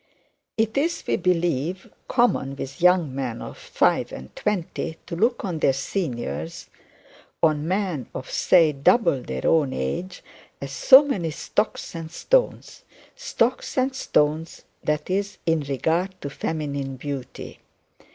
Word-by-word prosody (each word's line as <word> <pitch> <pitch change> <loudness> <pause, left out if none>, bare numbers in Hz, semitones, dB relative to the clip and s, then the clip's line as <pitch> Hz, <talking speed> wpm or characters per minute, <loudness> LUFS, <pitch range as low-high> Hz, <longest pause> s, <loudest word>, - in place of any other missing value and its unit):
It 220 +3 +1
is, 335 +4 -1
we - - +1
believe, 175 -1 0 0.2
common 235 - +1
with 135 +4 -7
young 180 -6 +4
men 130 -4 -3
of - - -8
five - - +1
and 65 0 -10
twenty 175 -5 -2
to 170 - -5
look 230 +7 +1
on 175 -5 -3
their 135 - +3
seniors 120 - -4 0.7
on 155 -1 +3
men 185 - -1
of, 130 - -5
say, 165 -4 +4
double 140 - +3
their 65 - -5
own 150 -5 +3
age 175 - -4 0.4
as 140 -1 -6
so 265 - +7
many 190 - -1
stocks 185 +7 -2
and 165 -2 -6
stones - - 0 0.3
stocks 260 - -1
and 260 +1 +1
stones, 155 - 0 0.2
that 150 0 -1
is, 200 +2 -1
in 165 -1 +2
regard 160 +7 -1
to 140 - -5
feminine 140 -2 -3
beauty. 135 -1 -7
165 Hz, 135 wpm, -24 LUFS, 140-195 Hz, 0.7 s, so